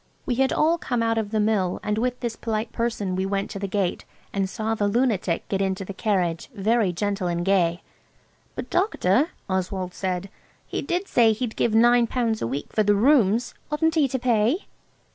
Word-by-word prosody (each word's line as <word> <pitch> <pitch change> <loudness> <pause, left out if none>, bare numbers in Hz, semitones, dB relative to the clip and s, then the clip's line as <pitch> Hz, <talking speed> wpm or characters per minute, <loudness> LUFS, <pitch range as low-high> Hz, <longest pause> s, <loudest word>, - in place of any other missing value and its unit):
We 255 - 0
had 265 +2 +2
all 330 +2 +2
come 245 -6 -1
out 225 0 +1
of 210 -2 -3
the 215 0 0
Mill, 210 -4 +1
and 210 +1 -1
with 250 +1 -1
this 235 -2 -2
polite 220 0 -3
person 225 -5 -2
we 190 - 0
went 195 0 -2
to 200 - -5
the 200 - -3
gate, 190 -2 -1 0.3
and 195 -1 0
saw 220 +2 -2
the 210 -2 0
lunatic 205 -6 0
get 195 -1 -1
into 190 0 -1
the 195 - -6
carriage, 180 -5 -1
very 215 -1 +2
gentle 200 +1 -2
and 175 0 -1
gay. 180 -3 +2 0.7
"But, - - -6
Doctor," 305 - +2 0.2
Oswald 185 -1 -2
said, 185 0 -3 0.3
"he - - -3
did 365 +3 -2
say 225 -2 +4
he'd 220 0 -4
give 225 -2 +1
nine 240 +1 +5
pounds 230 -2 -1
a - - -1
week 135 +4 -5
for 215 - +2
the 205 0 +3
rooms. 235 -1 +3 0.2
Oughtn't 320 +2 +2
he 310 -4 +3
to 260 0 -2
pay?" 240 - +1
215 Hz, 200 wpm, -24 LUFS, 190-240 Hz, 0.7 s, nine